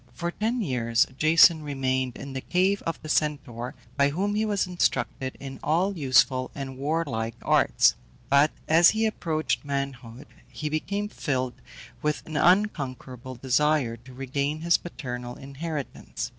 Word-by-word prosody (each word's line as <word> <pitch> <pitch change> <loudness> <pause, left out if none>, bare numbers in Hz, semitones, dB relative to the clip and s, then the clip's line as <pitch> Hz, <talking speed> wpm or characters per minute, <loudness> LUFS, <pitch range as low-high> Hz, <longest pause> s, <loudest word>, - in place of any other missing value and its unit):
For 170 +8 -3
ten 230 +6 -1
years 115 - +2
Jason 160 +2 +6
remained 130 -3 -1
in 140 - -8
the 135 - -4
cave 190 +5 +1
of 165 - -2
the - - -7
Centaur, 140 -6 -1 0.2
by 140 0 +4
whom 195 +8 -1
he 215 +1 +1
was 205 -2 +1
instructed 170 -6 -1
in 135 -1 -8
all 185 +6 +1
useful 130 -3 +3
and 135 -2 -5
warlike 135 -6 -2
arts. - - +4 0.3
But 140 +2 +5 0.2
as 165 +2 +7
he 220 +1 +1
approached 160 -7 -1
manhood 135 -3 -4 0.2
he 155 - -5
became 200 +7 -2
filled 130 - -3 0.4
with 150 0 -1
an 160 - -8
unconquerable 135 - 0
desire 130 0 +1
to 125 +3 -15
regain 140 +3 -2
his 170 0 +4
paternal 125 -7 -6
inheritance. 145 +1 -6
145 Hz, 145 wpm, -26 LUFS, 130-165 Hz, 0.4 s, as